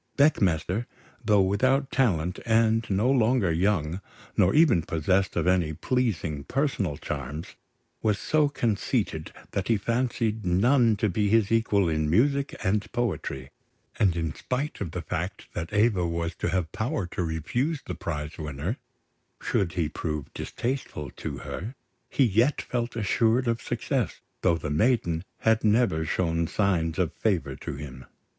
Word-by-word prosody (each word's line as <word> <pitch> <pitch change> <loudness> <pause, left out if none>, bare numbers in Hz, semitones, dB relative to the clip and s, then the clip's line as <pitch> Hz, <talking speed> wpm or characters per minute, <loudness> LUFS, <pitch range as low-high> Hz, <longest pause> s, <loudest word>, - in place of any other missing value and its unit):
Beckmesser, 105 - +2 0.4
though 105 -2 +4
without 130 +8 +2
talent, 90 -10 +1
and 115 0 +2
no 100 +4 +2
longer 120 -6 +3
young, 90 -1 0 0.3
nor 90 - +3
even 150 - +5
possessed 90 +4 0
of - - +1
any 90 -4 +2
pleasing 85 - -1
personal 105 - -1
charms, 75 +1 -5 0.5
was 105 -2 +2
so 155 +3 +2
conceited 110 - -1 0.2
that 95 -1 -2
he 115 - +3
fancied 115 0 -1
none 115 +6 +4
to 105 +2 +1
be 105 +2 +1
his 110 -1 +3
equal 105 -4 +3
in 80 -1 0
music 140 - +2
and 105 +2 0
poetry; 95 - -3 0.5
and 95 -5 +3
in 80 -2 -1
spite 130 - -3
of 95 - -2
the - - -5
fact - - -4
that 85 - -4
Eva 105 -4 +3
was 85 0 -2
to - - -2
have 90 -4 -1
power 115 - -2
to 85 - -4
refuse 120 - -1
the - - -4
prize 75 -1 -5
winner, 75 - -3 0.6
should 90 -4 0
he 85 -4 0
prove 75 -1 -4
distasteful 120 - -4
to - - -6
her, 110 +9 -6 0.3
he 140 - +2
yet 115 +7 +2
felt 120 -1 -3
assured 115 +3 +2
of 115 -1 0
success, - - -2 0.2
though 85 -2 +3
the 75 -2 -4
maiden 85 - +2 0.2
had 110 0 +3
never 105 -7 +3
shown 85 0 0
signs 85 -5 0
of - - 0
favour - - 0
to - - -6
him. 65 -3 -8
100 Hz, 150 wpm, -27 LUFS, 80-120 Hz, 0.6 s, even